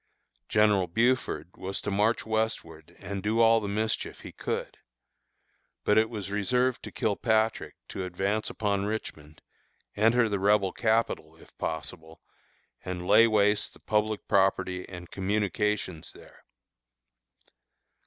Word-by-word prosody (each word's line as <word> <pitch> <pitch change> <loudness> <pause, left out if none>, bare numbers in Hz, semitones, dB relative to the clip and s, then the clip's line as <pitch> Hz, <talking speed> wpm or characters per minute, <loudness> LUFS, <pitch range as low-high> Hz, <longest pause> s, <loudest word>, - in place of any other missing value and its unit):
General 105 -3 +3
Buford 110 -6 0
was 95 +1 -4
to 105 - -3
march 105 +4 +1
westward 110 -8 -3
and 100 -1 -5
do 110 +3 0
all 115 0 +6
the 105 - -4
mischief 110 +2 -2
he - - -9
could. - - -4 1.0
But 105 - +4
it 110 0 +2
was 100 -4 -6
reserved 125 +5 +1
to - - -8
Kilpatrick 110 +1 0
to 95 - -4
advance 95 +4 -1
upon 100 -2 -1
Richmond, 80 -8 -6 0.5
enter 115 +2 +4
the 100 -2 -1
Rebel 100 -1 +3
capital, 110 -8 0
if 80 - -19
possible, 80 0 -5 0.6
and 90 -1 -5
lay 115 +5 +6
waste 105 -1 +2
the - - -18
public 110 0 -1
property 95 -2 +1
and 90 -2 -9
communications 105 -3 -1
there. - - -17
105 Hz, 125 wpm, -28 LUFS, 95-110 Hz, 1.0 s, all